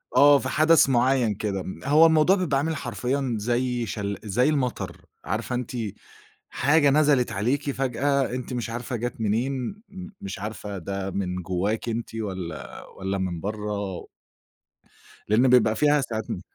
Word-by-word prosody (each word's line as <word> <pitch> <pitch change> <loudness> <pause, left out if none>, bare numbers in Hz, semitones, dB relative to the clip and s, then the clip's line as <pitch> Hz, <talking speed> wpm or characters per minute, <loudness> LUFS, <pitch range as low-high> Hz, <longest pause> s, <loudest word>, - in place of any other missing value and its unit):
آه، 145 0 +7
في 130 - -4
حدث 155 +2 +5
معيّن 125 -2 +3
كده، 100 -2 -3
م - - -7
هو 150 +4 +6
الموضوع 160 +3 +5
بيبقى 170 -8 0
عامل 160 +3 -1
حرفيًا 130 +1 -2
زي 120 +2 -1
شل 100 -2 -3
زي 115 +7 +2
المطر، 135 -5 -2 0.2
عارفة 110 +4 -2
أنتِ 125 -1 -4 0.8
حاجة 145 0 +3
نزلت 140 -5 +3
عليكِ 135 +8 0
فجأة، 135 +1 0
أنتِ 125 0 -5
مش 120 -2 -3
عارفة 120 +2 -4
جات 120 0 -4
منين، 120 +5 0 0.2
م 190 -2 -9
مش 95 0 -6
عارفة 105 -1 -6
ده 95 +2 -4
من 95 -2 -2
جواكِ 95 +6 -2
أنتِ 115 0 -4
والّا 95 -8 -6
والّا 95 0 -4
من 90 -3 -3
بَرّه 105 -2 -4 1.2
لأن 115 +5 +4
بيبقى 115 -3 +5
فيها 150 +2 +3
ساعات 110 -4 -4
م 90 - -4
120 Hz, 150 wpm, -25 LUFS, 105-140 Hz, 1.2 s, آه